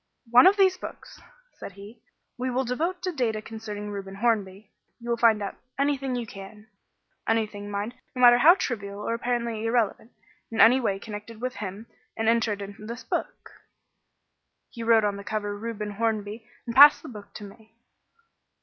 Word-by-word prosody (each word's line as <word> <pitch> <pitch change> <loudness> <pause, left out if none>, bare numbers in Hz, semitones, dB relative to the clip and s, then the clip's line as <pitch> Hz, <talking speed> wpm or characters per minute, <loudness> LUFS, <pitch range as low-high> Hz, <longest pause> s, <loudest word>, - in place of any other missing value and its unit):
"One 250 +9 +8
of 400 +2 +4
these 380 -2 +4
books," - - -10 0.4
said - - -8
he, 205 +4 -13 0.3
"we 255 +1 -3
will 255 +1 0
devote 330 +9 -2
to 365 - -1
data 240 -8 -1
concerning 215 -1 -7
Reuben 195 -1 -7
Hornby. 200 -2 -1 0.3
You 235 0 -5
will - - +2
find 225 -3 +4
out 195 - -6 0.2
anything 275 -2 0
you 240 -1 -3
can 210 +1 -11 0.6
anything, 215 -2 -1
mind, 205 +3 -3 0.2
no 250 - -3
matter 240 0 +8
how 330 +7 +8
trivial 200 - -4
or - - 0
apparently 235 -2 -2
irrelevant 225 0 0 0.4
in 225 - -5
any 245 +4 +7
way 200 -6 -1
connected 210 +2 -9
with 250 -2 -4
him 205 +1 -6 0.3
and 225 0 -1
enter 230 -1 +2
it 200 0 -6
in 200 0 -9
this 235 +2 -7
book." - - -4 1.2
He 235 - -9
wrote 225 -1 +4
on 200 -1 -1
the 200 - -8
cover 205 -1 -3
"Reuben 210 -1 -5
Hornby" 220 +1 -3 0.2
and 235 - -5
passed 285 +2 +9
the - - -9
book 210 -4 -12
to 210 - -8
me. 220 +2 -14
225 Hz, 175 wpm, -26 LUFS, 205-245 Hz, 1.2 s, passed